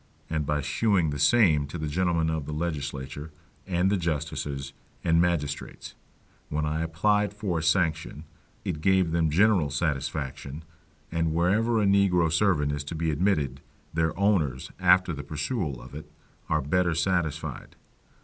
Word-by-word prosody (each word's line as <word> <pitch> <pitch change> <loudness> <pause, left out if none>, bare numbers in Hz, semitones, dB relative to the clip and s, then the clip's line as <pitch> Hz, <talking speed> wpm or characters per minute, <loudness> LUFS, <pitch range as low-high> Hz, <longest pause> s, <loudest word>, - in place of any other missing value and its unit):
And 80 -3 -1
by 75 -1 0
shewing 90 0 +1
the 70 - -4
same 75 -3 +4
to 80 - -6
the 80 - -3
gentlemen 80 0 +1
of 80 -3 -3
the 75 - -4
legislature, 75 -2 -4 0.4
and 90 +1 +1
the 100 - +2
justices, 75 -4 -3 0.3
and 85 0 +3
magistrates, 75 -4 -2 0.6
when 75 0 -1
I 75 +1 -1
applied 105 +5 +1
for 100 -6 -2
a - - -4
sanction, 80 -3 0 0.4
it 75 - -3
gave 95 -1 +3
them 80 -1 +2
general 90 -2 +3
satisfaction; 70 -1 -3 0.5
and 80 -1 0
wherever 110 +7 +2
a 105 - +2
negro 95 -4 +3
servant 85 -5 +2
is 70 0 -3
to 75 - -5
be 80 0 0
admitted, 75 -5 0 0.3
their 80 0 0
owners, 80 -11 +1
after 90 -2 +4
the 70 - -5
perusal 75 - -3
of - - -12
it, 75 +1 -9 0.4
are 75 -2 +1
better 85 +3 +1
satisfied. 85 -3 -2
80 Hz, 150 wpm, -27 LUFS, 75-90 Hz, 0.6 s, same